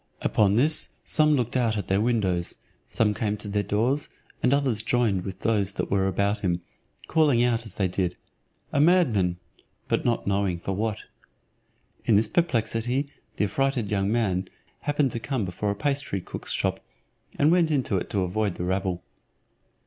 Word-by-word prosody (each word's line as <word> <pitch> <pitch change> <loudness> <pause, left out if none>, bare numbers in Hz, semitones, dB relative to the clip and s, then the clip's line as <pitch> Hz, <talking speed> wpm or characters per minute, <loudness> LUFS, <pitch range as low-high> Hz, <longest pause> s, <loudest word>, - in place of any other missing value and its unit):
Upon 105 -2 +3
this 150 +6 +2
some 155 -1 +3
looked 120 -2 -1
out 115 -4 +1
at 100 - -3
their 95 +1 +2
windows, 100 -7 0 0.3
some 105 -2 +1
came 105 0 -1
to 105 - -7
their 105 0 0
doors, 120 +8 0 0.3
and 125 - +3
others 135 -6 +2
joined 110 -5 +1
with 95 -1 -7
those 100 -4 +1
that - - -3
were 95 -1 +2
about 100 +2 0
him, 90 -2 -1 0.4
calling 145 -7 +3
out 115 -2 0
as - - -4
they 95 - +1
did, 90 -1 -2 0.6
"A - - +2
madman;" 125 - +3 0.5
but - - 0
not 120 -1 0
knowing 100 -3 0
for 95 - -4
what. 105 +2 -1 1.1
In 110 - +3
this 105 +2 +4
perplexity 125 -2 0 0.2
the 105 - +1
affrighted 125 +1 -1
young 100 0 +1
man 95 -5 0 0.3
happened 145 -3 +1
to 115 - -3
come 125 -3 -2
before 95 +3 -3
a 100 - -1
pastry 140 -4 -1
cook's - - -6
shop, - - 0 0.6
and 150 +3 +4
went 175 -2 +4
into 130 -9 +1
it - - -4
to 100 -2 0
avoid 100 +1 -1
the - - -4
rabble. 95 -1 -1
110 Hz, 170 wpm, -26 LUFS, 95-125 Hz, 1.1 s, this